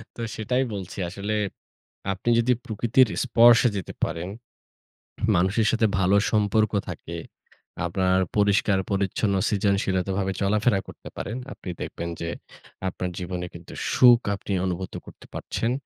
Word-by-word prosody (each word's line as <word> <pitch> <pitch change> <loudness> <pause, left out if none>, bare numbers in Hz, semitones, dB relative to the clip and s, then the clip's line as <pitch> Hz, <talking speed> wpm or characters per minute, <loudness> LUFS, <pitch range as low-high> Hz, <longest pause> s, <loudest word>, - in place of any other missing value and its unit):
তো - - -7
সেটাই 125 +4 0
বলছি। 95 -3 -6
আসলে 100 +3 -4 0.8
আপনি 95 +5 -5
যদি 120 +2 +3
প্রকৃতির 120 +3 +3 0.2
স্পর্শে 120 0 +6
যেতে 95 - -4
পারেন, 85 +2 -4 1.1
মানুষের 95 +5 +2
সাথে 115 -1 +2
ভালো 95 +1 +3 0.2
সম্পর্ক 110 0 +2 0.2
থাকে, - - -7 0.7
আপনার 95 +2 +2 0.2
পরিষ্কার 100 -1 +3
পরিচ্ছন্ন 100 +1 0
সৃজনশীলতাভাবে 95 -1 0
চলাফেরা 105 +1 +2
করতে - - -10
পারেন, 110 - -4 0.2
আপনি - - -9
দেখবেন 85 - -4
যে 85 - -2 0.6
আপনার 90 0 -3
জীবনে 90 -1 -4
কিন্তু 85 0 -11 0.2
সুখ 120 -2 +7 0.2
আপনি 100 - -7
অনুভূত 95 0 -3
করতে - - -14
পারছেন। 115 - -2
100 Hz, 125 wpm, -25 LUFS, 95-110 Hz, 1.1 s, সুখ